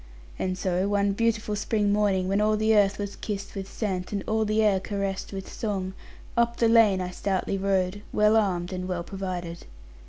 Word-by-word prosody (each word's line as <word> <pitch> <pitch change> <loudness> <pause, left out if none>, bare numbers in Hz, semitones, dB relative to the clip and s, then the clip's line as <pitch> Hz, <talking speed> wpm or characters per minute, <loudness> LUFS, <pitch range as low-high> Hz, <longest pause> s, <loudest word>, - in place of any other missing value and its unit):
And 185 0 -1
so, 185 +1 0
one 200 0 +2
beautiful 215 0 0
spring 205 0 +1
morning, 200 -3 +2
when 195 +2 +1
all 215 0 +3
the 220 +1 +3
earth 205 -1 +4
was 200 -1 -4
kissed 200 -2 -5
with 195 0 -6
scent, 185 -5 -3
and 200 -2 -2
all 220 0 +1
the 215 +1 +2
air 200 -3 +3
caressed 195 0 -3
with 195 -1 -6
song, 195 -4 -3 0.4
up 235 0 +2
the 230 - +3
lane 225 -4 +5
I 180 -1 -3
stoutly 195 +1 -1
rode, 195 0 0
well 210 +1 +4
armed, 185 -4 +1
and 185 0 -4
well 180 -2 -2
provided. 180 -3 -5
200 Hz, 190 wpm, -26 LUFS, 185-210 Hz, 0.4 s, lane